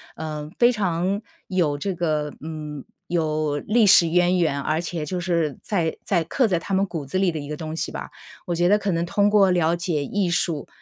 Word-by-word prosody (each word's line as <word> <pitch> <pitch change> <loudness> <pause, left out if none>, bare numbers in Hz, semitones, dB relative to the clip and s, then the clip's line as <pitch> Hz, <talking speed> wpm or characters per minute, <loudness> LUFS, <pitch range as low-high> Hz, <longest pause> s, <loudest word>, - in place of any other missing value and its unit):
呃， 150 -1 -5
非 240 0 +6
常， 190 -2 -1 0.3
有 170 -6 +1
这 190 +6 -2
个， 155 -4 -1
嗯， 150 -2 -6 0.2
有 155 -3 0
历 215 +5 +3
史 170 -2 +7
渊 180 +2 +3
源。 160 -5 +1
而 155 +4 0
且 170 -3 -4
就 180 +4 -3
是 170 -5 0
在 170 -6 -1
在 175 -4 +1
刻 250 - +1
在 180 -5 +1
他 195 - -5
们 190 +1 +3
骨 165 -7 -5
子 140 +7 -3
里 185 -2 +2
的 160 - -4
一 145 - -7
个 150 - -4
东 155 0 -5
西 - - -3
吧。 - - -6 0.4
我 175 - -2
觉 175 +1 +2
得 205 +3 +5
可 200 -1 -1
能 170 0 0
通 205 +3 +2
过 200 -2 +5
了 170 -2 +2
解 170 -4 -1
艺 195 +5 -1
术， 165 -3 -1
170 Hz, 235 characters per minute, -23 LUFS, 155-190 Hz, 0.4 s, 史